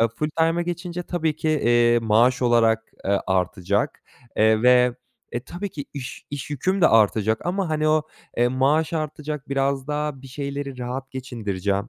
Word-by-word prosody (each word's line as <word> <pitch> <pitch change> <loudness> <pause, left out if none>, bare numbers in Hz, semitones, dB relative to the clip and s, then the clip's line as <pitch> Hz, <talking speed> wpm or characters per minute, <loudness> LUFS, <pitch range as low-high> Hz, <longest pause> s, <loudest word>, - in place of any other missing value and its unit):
Eee, 115 - +4
full-time'a 160 +7 0
geçince 175 0 -4
tabii 160 -4 -1
ki, 155 - -2
eee, 120 -5 +3
maaş 115 +3 +3
olarak, 115 -2 +3 0.2
eee, 100 0 +1
artacak, 95 +1 0 0.3
eee, 110 +1 +4
ve, 125 0 +5 0.4
e, 120 - -2
tabii 175 +10 -6
ki 145 -2 -6
iş 135 -2 -7
iş 145 -1 -6
yüküm 185 +8 0
de 170 - +6
artacak 110 - +2
ama, 185 0 -1
hani, 155 0 +1
o, 155 0 +3 0.3
eee, 120 +1 +3
maaş 140 +6 +1
artacak 150 -2 -4
biraz 135 -1 0
daha 150 -2 -3
bir 135 - -10
şeyleri 140 0 -5
rahat 130 +2 -5
geçindireceğim. 105 -5 -3
135 Hz, 160 wpm, -23 LUFS, 115-155 Hz, 0.4 s, de